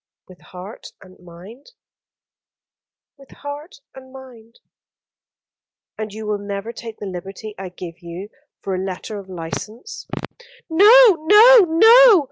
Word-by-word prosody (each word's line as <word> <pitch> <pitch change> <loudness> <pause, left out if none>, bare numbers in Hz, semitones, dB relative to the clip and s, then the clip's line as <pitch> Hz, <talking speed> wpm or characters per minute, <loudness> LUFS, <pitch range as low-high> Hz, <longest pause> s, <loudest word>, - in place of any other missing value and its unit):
"With 185 -1 -18
heart 185 +4 -12 0.2
and 185 0 -19
mind?" 185 - -16 1.5
"With 275 - -18
heart 290 +3 -10 0.2
and 260 0 -15
mind." 245 -4 -16 1.4
"And 215 -1 -7
you 215 +1 -9
will 210 -1 -3
never 200 +3 -7
take 225 -1 -10
the - - -9
liberty 195 +3 -9
I 190 -1 -7
give 175 -1 -11
you 175 +4 -10 0.3
for 195 - -4
a 185 0 -3
letter 195 +2 -7
of 195 -1 -14
license?" 215 - -9 0.6
"No, 420 +6 +6
no, 465 +4 +8
no. 445 +5 +6
220 Hz, 125 wpm, -19 LUFS, 190-295 Hz, 1.5 s, no